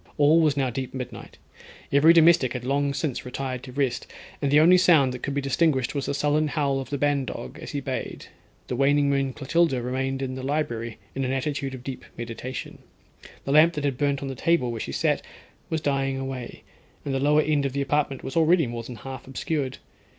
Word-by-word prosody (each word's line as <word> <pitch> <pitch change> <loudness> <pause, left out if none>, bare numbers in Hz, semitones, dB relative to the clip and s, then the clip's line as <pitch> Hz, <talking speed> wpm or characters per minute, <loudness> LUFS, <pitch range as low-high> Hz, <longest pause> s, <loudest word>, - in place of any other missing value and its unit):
All 150 +3 +5
was 150 -3 +2
now 130 -2 +1
deep 130 +2 -5
midnight; 125 -2 -7 0.5
every 140 +4 +6
domestic 165 -6 +5
had 125 -2 -5
long 140 +1 +1
since 140 -2 -3
retired 130 0 -4
to 130 - -10
rest, 130 -2 -1 0.3
and 140 - +1
the 145 +2 +6
only 180 +4 +6
sound 155 -8 +5
that 125 - -7
could 140 - -3
be 140 - 0
distinguished 135 -2 +1
was 140 -2 -3
the 140 - -1
sullen 150 +2 +1
howl 140 -3 0
of 130 -2 -6
the 145 - -2
ban 145 0 +1
dog - - -7
as - - -7
he 145 - -3
bayed, 130 -1 -5 0.4
the 125 - -3
waning 140 +2 +3
moon 135 -1 +1
Clotilda 145 +1 +1
remained 130 +2 -2
in 130 -1 -3
the 130 - -5
library 120 -5 -2 0.2
in 135 - -2
an 130 - -1
attitude 135 0 -2
of 125 - -11
deep 130 0 -6
meditation. 120 +2 -6 0.7
The 135 - -2
lamp 155 +4 +6
that 140 -3 -1
burnt 140 -1 0
on - - -3
the 135 - -4
table, 130 -2 +1
where 115 -2 -5
she - - -4
sat, - - +1 0.5
was 160 -1 -1
dying 135 -2 0
away, 135 -2 -6 0.4
and 140 - -2
the 135 - 0
lower 150 +2 +4
end 145 -2 +1
of 130 - -7
the 140 - -1
apartment 140 -1 -1
was 135 - -6
already 165 0 +4
more 120 -1 -4
than 120 +1 -8
half 130 +3 -9
obscured. 135 0 -3
135 Hz, 215 wpm, -25 LUFS, 130-145 Hz, 0.7 s, every